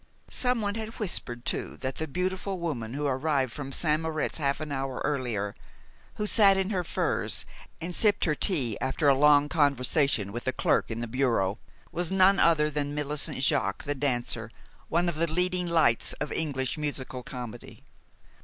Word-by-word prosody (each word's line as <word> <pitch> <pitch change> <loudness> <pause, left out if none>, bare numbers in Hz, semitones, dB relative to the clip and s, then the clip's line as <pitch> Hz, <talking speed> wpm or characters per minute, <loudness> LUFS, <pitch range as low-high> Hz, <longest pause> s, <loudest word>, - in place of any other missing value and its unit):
Someone 235 -5 +1
had 220 +1 -6
whispered 120 - -1
too - - -2
that 130 0 -4
the 160 - -2
beautiful 185 +5 -2
woman 130 -9 -4
who 145 +1 -2
arrived 135 -2 0
from 135 -2 -6
St. 155 +2 +2
Moritz 160 0 -2
half 140 -1 0
an 155 -1 -5
hour 135 -2 -3
earlier, 120 -9 -1 0.6
who 210 - -2
sat 200 -2 +5
in 190 +2 0
her 185 -3 0
furs - - -1 0.3
and 175 +2 -5
sipped 205 +2 +3
her 155 - +2
tea 140 - 0
after 135 +3 0
a 140 - +7
long 145 +1 +5
conversation 140 - +2
with 120 +4 -6
a - - +3
clerk - - +1
in 115 0 -4
the 120 - -3
bureau, 115 -5 0 0.3
was 175 +1 -1
none 190 +1 +5
other 155 -3 +4
than 145 0 -2
Millicent 150 -2 -1
Jaques, - - +1
the 145 - 0
dancer, 120 -5 -1 0.4
one 170 +2 +1
of 170 -3 -1
the 165 0 0
leading 180 +1 0
lights 160 -9 +2
of 150 - -4
English 140 -3 -1
musical 135 -4 -3
comedy. 125 -3 -8
145 Hz, 170 wpm, -28 LUFS, 130-170 Hz, 0.6 s, a